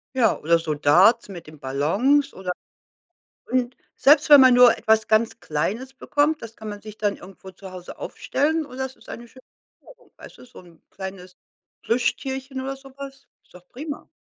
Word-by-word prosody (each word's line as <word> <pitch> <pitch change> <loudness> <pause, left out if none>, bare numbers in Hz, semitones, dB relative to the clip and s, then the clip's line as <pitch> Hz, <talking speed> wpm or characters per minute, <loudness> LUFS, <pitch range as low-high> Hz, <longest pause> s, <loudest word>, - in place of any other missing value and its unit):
Ja, 235 -4 +2
oder 170 +2 +3
so 160 -2 -3
Darts 180 +11 +4
mit 175 -4 -9
den 155 -2 -14
Ballons 195 - +1
oder 185 -1 -5 1.0
Und 250 -1 -1 0.2
selbst 295 +2 +4
wenn 290 -2 +10
man 255 -1 +6
nur 245 -1 +7
etwas 220 -1 +1
ganz 220 +1 +1
Kleines 215 - -3
bekommt, 295 +4 0
das 230 -1 -10
kann 215 -1 -8
man 205 0 -8
sich 215 0 -11
dann 205 -1 -1
irgendwo 190 0 -13
zu 190 0 -12
Hause 180 -1 -10
aufstellen 310 +2 -2
und 260 -1 -11
es 265 0 -4
ist - - -22
eine 235 0 -9
schöne 260 +2 -18 0.4
Erinnerung, - - -19
weißt - - -14
du, - - -14
so 245 - -15
'n 170 -2 -20
kleines 190 -1 -9 0.5
Plüschtierchen 265 +3 -2
oder 270 +1 -4
so 270 0 -15
was, 275 -1 -10 0.2
ist - - -29
doch 180 0 -16
prima. 290 +3 -8
230 Hz, 185 wpm, -23 LUFS, 185-265 Hz, 1.0 s, wenn